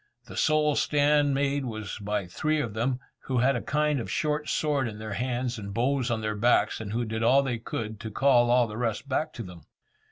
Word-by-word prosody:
The - - -10
sole 155 -1 +2
stand 145 -1 +3
made 140 0 0
was 110 -4 -5
by 105 -1 -2
three 155 - -1
of 120 -8 -2
them, 125 +4 -1 0.3
who 130 - -1
had 130 +3 +3
a 120 - -2
kind 150 -1 +1
of 115 - -5
short 150 -1 -1
sword 145 -5 +1
in 105 -2 -6
their 110 -1 -6
hands, 125 0 -2
and 100 -1 -7
bows 130 +1 +1
on 115 -2 -1
their 110 0 -1
backs, 115 +1 +2
and 105 -2 -6
who 120 +2 -1
did 110 0 -3
all 130 +4 +5
they 125 -4 -2
could 110 -1 -5
to 115 - -6
call 120 +1 +4
all 125 0 +5
the 110 -1 -7
rest 115 +2 -2
back 155 +3 -1
to 115 - -6
them. 90 -3 -11
120 Hz, 225 wpm, -27 LUFS, 110-140 Hz, 0.3 s, all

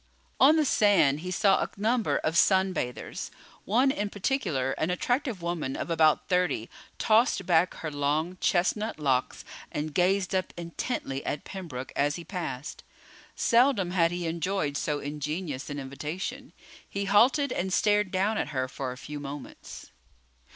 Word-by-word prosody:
On 290 +4 +7
the 310 -1 +3
sand 195 - +4
he 180 +3 -6
saw 195 +1 +3
a - - -1
number 225 +3 +1
of 160 - -1
sun 190 +1 +4
bathers. 125 -7 -4 0.4
One 250 +6 +3
in 205 -5 -2
particular, 185 - -1
an 155 - 0
attractive 240 - -1
woman 170 -6 -2
of - - -4
about 155 -2 +3
thirty, 180 - 0 0.3
tossed 220 -3 +3
back 175 0 +3
her 155 - -5
long, 150 +5 -1
chestnut 210 +5 +1
locks 130 -3 0 0.3
and 150 0 -3
gazed 185 +2 +2
up 185 -1 -1
intently 170 - -4
at 145 - -3
Pembroke 160 -10 -7
as 145 +1 +1
he 170 - -7
passed. 165 -7 -5 0.5
Seldom 230 -6 +3
had 170 -3 +3
he 175 0 -4
enjoyed 165 -2 -1
so 150 +1 -1
ingenuous 150 0 -4
an 145 - -4
invitation. 160 - -5 0.4
He 200 0 -3
halted 250 +8 +4
and 190 +2 -2
stared 210 0 +2
down 200 +4 0
at - - -1
her 130 -3 -2
for 130 0 -5
a 125 - -8
few 150 +3 -7
moments. 140 - -9
175 Hz, 155 wpm, -28 LUFS, 145-205 Hz, 0.5 s, On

